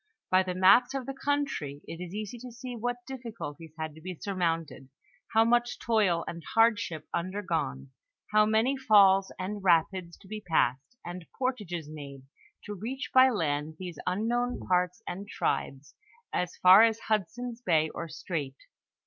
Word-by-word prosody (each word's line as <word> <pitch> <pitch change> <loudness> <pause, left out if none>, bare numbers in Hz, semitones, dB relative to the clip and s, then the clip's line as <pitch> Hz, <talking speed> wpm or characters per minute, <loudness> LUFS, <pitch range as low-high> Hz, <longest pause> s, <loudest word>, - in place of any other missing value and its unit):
By 185 0 +6
the 185 -1 -3
maps 200 +8 +5
of 265 -2 -3
the 270 - -4
country 270 - -2
it 165 - -7
is 180 +2 -7
easy 215 +3 -5
to 250 +1 -9
see 245 +1 -7
what 245 +1 -3
difficulties 215 - -8
had 155 -1 -4
to 160 - -14
be 180 +2 -6
surmounted, 165 -8 -2 0.4
how 225 0 +5
much 240 +1 +2
toil 200 -7 +1
and 170 - -6
hardship 225 -8 +2
undergone, 170 - -2 0.4
how 210 0 +5
many 220 +5 +2
falls 200 -7 +5
and 200 +2 -4
rapids 170 0 +2
to 195 - -18
be 215 +1 -6
passed, 160 - 0
and 175 -1 -7
portages 205 - -2
made, 140 -3 -9 0.4
to 205 - -6
reach 240 +8 -5
by 260 0 +7
land 155 - -1
these 180 -1 -7
unknown 240 +6 -1
parts 180 +2 +1
and 195 +3 -5
tribes, 140 -7 -2 0.4
as 180 -1 -1
far 185 +3 +8
as 225 0 +3
Hud 210 -6 0
son's 245 +1 -7
bay 160 -7 +2
or 165 +1 -6
strait. 155 -4 -4
190 Hz, 160 wpm, -29 LUFS, 165-230 Hz, 0.4 s, far